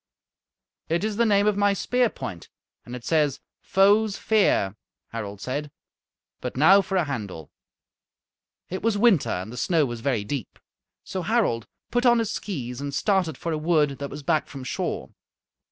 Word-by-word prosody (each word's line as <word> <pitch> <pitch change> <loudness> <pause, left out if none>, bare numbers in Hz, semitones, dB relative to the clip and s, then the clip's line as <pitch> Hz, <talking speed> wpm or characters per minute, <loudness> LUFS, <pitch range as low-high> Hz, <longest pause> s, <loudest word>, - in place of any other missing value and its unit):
"It 170 +4 +1
is 215 -1 -1
the 235 0 +3
name 200 -1 +4
of 210 -1 +3
my 205 0 +3
spear 245 +4 +1
point, 90 - -7 0.4
and 120 - -7
it 125 - -9
says, 150 -4 +2 0.2
'Foes' 200 +2 +3
fear,'" 195 - +2 0.3
Harald 105 -3 -6
said. 145 +3 -3 0.7
"But 125 0 -5
now 190 +8 +7
for 195 0 -4
a 180 - +3
handle." 105 - -5 1.2
It 185 - -5
was 225 -2 +1
winter 205 - +4
and 95 +6 -3
the - - -8
snow 160 +3 +2
was 120 -3 -5
very 120 -5 0
deep. 120 +2 -5 0.5
So 190 - -4
Harald 185 - +1 0.2
put 245 +1 +2
on 240 0 +6
his 225 -2 0
skees 130 - -5
and 140 -1 -4
started 185 -8 +1
for 170 - -3
a 155 - -1
wood 150 -4 +2
that 140 0 -4
was 150 - -8
back 155 +2 +1
from 135 -2 -8
shore. - - -3
155 Hz, 170 wpm, -25 LUFS, 125-200 Hz, 1.2 s, now